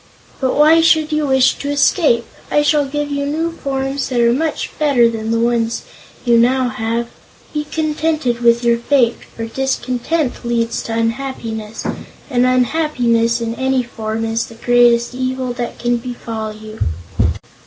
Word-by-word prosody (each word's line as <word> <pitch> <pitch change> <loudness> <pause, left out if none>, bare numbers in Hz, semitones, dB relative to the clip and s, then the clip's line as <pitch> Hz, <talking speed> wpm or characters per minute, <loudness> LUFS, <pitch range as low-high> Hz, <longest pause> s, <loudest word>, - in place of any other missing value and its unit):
But 260 -2 0
why 315 +2 +6
should 315 -1 +3
you 305 -1 0
wish 265 -1 +4
to 285 - -4
escape? 285 -4 +3 0.2
I 295 - +3
shall 295 -1 +3
give 295 +1 -3
you 285 0 -1
new 325 +3 -1
forms 270 -3 -3
that 250 -2 0
are 235 0 +4
much 315 +4 -2
better 280 -6 +4
than 225 -1 -3
the 230 0 +1
ones 235 0 0 0.4
you 235 -1 +5
now 255 +1 +3
have. 230 +1 -2 0.4
Be 300 0 -2
contented 310 -5 -1
with 235 0 +3
your 235 -1 +3
fate, 240 -2 +2 0.2
for 230 - -4
discontent 265 +3 -2
leads 235 -1 -1
to 225 - -4
unhappiness, 230 -2 -3 0.5
and 250 0 +3
unhappiness, 245 -3 +1
in 230 0 -2
any 260 +1 0
form, 225 -1 -4
is 225 +1 -1
the 230 - -13
greatest 240 0 +3
evil 255 0 -2
that 240 -1 -5
can 240 0 0
befall 230 -3 -5
you." 215 +1 -11
245 Hz, 155 wpm, -17 LUFS, 230-285 Hz, 0.5 s, why